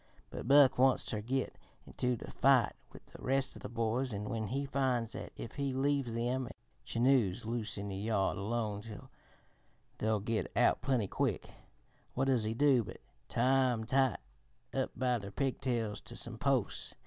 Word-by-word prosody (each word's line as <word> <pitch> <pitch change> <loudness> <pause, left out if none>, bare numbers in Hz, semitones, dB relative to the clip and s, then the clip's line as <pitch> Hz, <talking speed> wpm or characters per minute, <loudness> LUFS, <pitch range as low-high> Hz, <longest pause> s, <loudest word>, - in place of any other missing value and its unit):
But - - -6
Buck 135 -2 +6
wants 130 0 +4
ter 105 -3 -2
git 130 +4 -2 0.3
into 125 0 -1
the - - -9
fight 135 -5 +4 0.2
with - - -14
the - - -14
rest 135 +1 +1
of - - -11
the - - -6
boys, 120 +3 -1
an' 105 +1 -4
when 110 -2 -2
he 140 +6 -2
finds 130 -4 0
that - - -7
if 115 - -7
he 140 -2 -1
leaves 135 -3 0
them 125 +2 -1 0.3
Chinos 115 -6 +2
loose 110 -2 -2
in 100 +1 -4
the 95 - -4
yard 100 -1 0
alone 105 0 -2 1.2
they'll 110 0 +1
git 110 +2 -2
out - - +4
plenty 125 -7 +1
quick, - - -1 0.6
what - - +1
does 130 -5 +2
he 110 +1 -1
do 135 -2 +4
but - - -9 0.3
tie 130 0 +3
'em 110 -1 -3
tight 130 +1 +2 0.6
up - - 0
by 125 -2 +1
their 100 -1 -7
pigtails 120 -3 -1
to 120 - -10
some 120 -1 -5
posts. 135 -6 0
120 Hz, 170 wpm, -33 LUFS, 110-135 Hz, 1.2 s, Buck